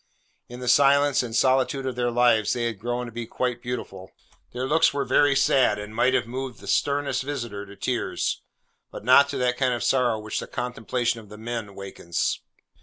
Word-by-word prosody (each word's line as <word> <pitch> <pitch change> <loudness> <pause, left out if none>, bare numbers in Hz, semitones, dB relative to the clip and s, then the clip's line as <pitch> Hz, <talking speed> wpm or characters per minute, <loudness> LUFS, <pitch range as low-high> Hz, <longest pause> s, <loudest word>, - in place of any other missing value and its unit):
In 120 +1 -9
the 125 - -5
silence 140 +2 +4
and 115 -3 -5
solitude 130 +2 +2
of 130 -2 -3
their 120 0 0
lives 120 -3 +3
they 120 - -2
had 115 -4 -3
grown 120 +2 -3
to 120 - -8
be 115 0 -6
quite 125 0 -2
beautiful. 95 -6 -6 0.4
Their 125 +1 -3
looks 155 +4 +3
were 140 - 0
very 145 -1 +3
sad, 130 -6 +3
and 105 +1 -8
might 130 +3 +3
have 125 - +1
moved 130 +1 -6
the - - -13
sternest 140 -2 0
visitor 120 -8 -5
to 100 - -12
tears, 125 +3 -2 0.5
but - - -10
not 140 +3 +6
to 140 - -3
that 125 -1 0
kind 125 -2 +1
of 120 - -4
sorrow 120 -2 +2
which 110 0 -4
the - - -6
contemplation 120 -1 -2
of 105 -3 -14
the 105 - -11
men 115 0 -4
awakens. 95 -4 -3
125 Hz, 200 wpm, -25 LUFS, 115-130 Hz, 0.5 s, not